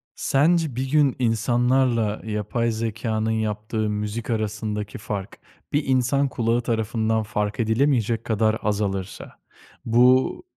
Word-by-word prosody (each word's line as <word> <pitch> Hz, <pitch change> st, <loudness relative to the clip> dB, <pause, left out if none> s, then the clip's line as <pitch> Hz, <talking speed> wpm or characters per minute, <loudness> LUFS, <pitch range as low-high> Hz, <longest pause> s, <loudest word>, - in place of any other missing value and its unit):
Sence 155 Hz, 0 st, +2 dB
bir 130 Hz, +1 st, -2 dB
gün 145 Hz, -3 st, +3 dB
insanlarla 120 Hz, -1 st, +1 dB
yapay 110 Hz, +2 st, -1 dB
zekânın 110 Hz, 0 st, -2 dB
yaptığı 110 Hz, 0 st, -2 dB
müzik 105 Hz, +2 st, -4 dB
arasındaki 105 Hz, -2 st, -3 dB
fark, 100 Hz, -2 st, -6 dB, 0.3 s
bir 145 Hz, 0 st, +2 dB
insan 130 Hz, +2 st, +2 dB
kulağı 120 Hz, -1 st, 0 dB
tarafından 110 Hz, -1 st, 0 dB
fark 105 Hz, +1 st, -3 dB
edilemeyecek 115 Hz, -1 st, +1 dB
kadar 110 Hz, 0 st, +1 dB
azalırsa, 100 Hz, -2 st, -3 dB, 0.5 s
bu 125 Hz, -, +3 dB
110 Hz, 110 wpm, -23 LUFS, 105-125 Hz, 0.5 s, gün